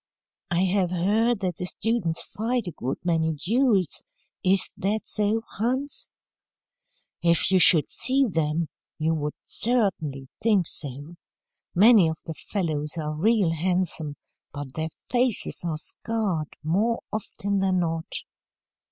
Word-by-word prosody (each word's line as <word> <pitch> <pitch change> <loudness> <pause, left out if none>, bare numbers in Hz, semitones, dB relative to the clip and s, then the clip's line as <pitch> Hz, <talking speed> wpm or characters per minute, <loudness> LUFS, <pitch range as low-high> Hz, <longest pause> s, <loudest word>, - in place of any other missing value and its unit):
"I 175 +1 +2
have 190 -1 +2
heard 205 +6 +1
that 180 -3 -2
the 180 - -2
students 200 -6 0
fight 235 +2 -2
a 175 - -4
good 130 -3 -4
many 160 -2 +1
duels. 200 - +1 0.4
Is 190 0 +3
that 210 +3 -1
so, 215 +1 0
Hans?" 260 +6 -2 1.1
"If 170 +2 +3
you 190 - +5
should 165 -3 +6
see 270 +1 +2
them, 165 -5 0 0.3
you 160 +1 +1
would 150 -1 -2
certainly 180 - -1
think 210 -5 +3
so. 145 +3 -2 0.6
Many 205 -1 +7
of 160 - -4
the 165 - -4
fellows 155 -4 -3
are 155 -1 -2
real 200 +2 +2
handsome, 165 -3 -1 0.4
but 145 -2 -7
their 160 0 -2 0.2
faces 245 -7 +2
are 165 -3 -2
scarred 195 -2 -1
more 210 +9 +1
often 200 -1 -2
than 190 -1 +2
not. 165 -1 -3
180 Hz, 130 wpm, -25 LUFS, 160-215 Hz, 1.1 s, Many